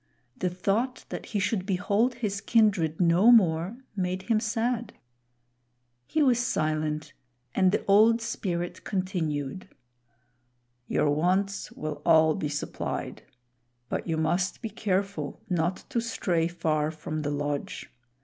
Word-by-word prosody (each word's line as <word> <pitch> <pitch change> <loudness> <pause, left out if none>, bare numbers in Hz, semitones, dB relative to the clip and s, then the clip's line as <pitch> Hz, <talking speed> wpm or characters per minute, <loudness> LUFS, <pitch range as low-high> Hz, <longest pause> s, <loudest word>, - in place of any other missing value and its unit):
The 185 -7 -1
thought 210 +8 -1
that - - -6
he 210 - -1
should 195 0 0
behold 205 +5 +1
his 205 -4 -3
kindred 200 -8 +2
no 180 +6 +5
more 185 -1 +4 0.2
made 185 -1 -2
him 225 0 +2
sad. 230 +1 -1 1.1
He 315 - +2
was 250 -4 +4
silent, 155 -8 -1 0.4
and 185 -1 +4
the - - -1
Old 220 +3 +5
Spirit 175 -7 -3
continued: 180 -5 -2 1.2
"Your 145 - +2
wants 190 +6 0
will 155 -1 -5
all 160 -1 +5
be 150 - -3
supplied; 150 0 -4 0.7
but - - -3
you 165 -1 0
must 175 +7 0
be 225 - -2
careful 195 -8 -2
not 175 +1 0
to 240 -4 +1
stray 175 -7 0
far 155 -3 0
from 155 0 -5
the 145 - -2
lodge. 145 0 -3
185 Hz, 130 wpm, -27 LUFS, 160-215 Hz, 1.2 s, no